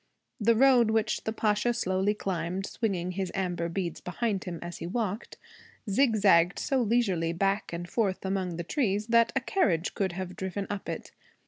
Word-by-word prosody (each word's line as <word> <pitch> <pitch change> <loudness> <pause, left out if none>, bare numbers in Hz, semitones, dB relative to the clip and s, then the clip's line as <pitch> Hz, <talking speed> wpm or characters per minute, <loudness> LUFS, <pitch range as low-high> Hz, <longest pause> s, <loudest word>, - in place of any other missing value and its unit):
The 230 +1 +4
road 250 -2 +5
which 220 -1 0
the 220 - 0
Pasha 220 +2 +1
slowly 190 -1 +1
climbed, 185 -1 -2
swinging 185 -7 -2
his 185 -1 -3
amber 175 -3 -1
beads 170 -1 -3
behind 200 +1 -2
him 175 -2 -4
as 175 0 -7
he 170 - -5
walked, 210 +1 -3 0.5
zigzagged 200 -6 +4
so 270 -2 0
leisurely 200 -8 +1
back 195 +4 0
and 175 +1 -5
forth 195 -1 -1
among 190 -2 -1
the 170 - -3
trees 210 - 0
that 230 0 +4
a - - +3
carriage 185 - +1
could 190 -3 -1
have 185 0 -5
driven 190 +1 -3
up 205 -1 -5
it. - - -5
195 Hz, 170 wpm, -28 LUFS, 180-220 Hz, 0.5 s, road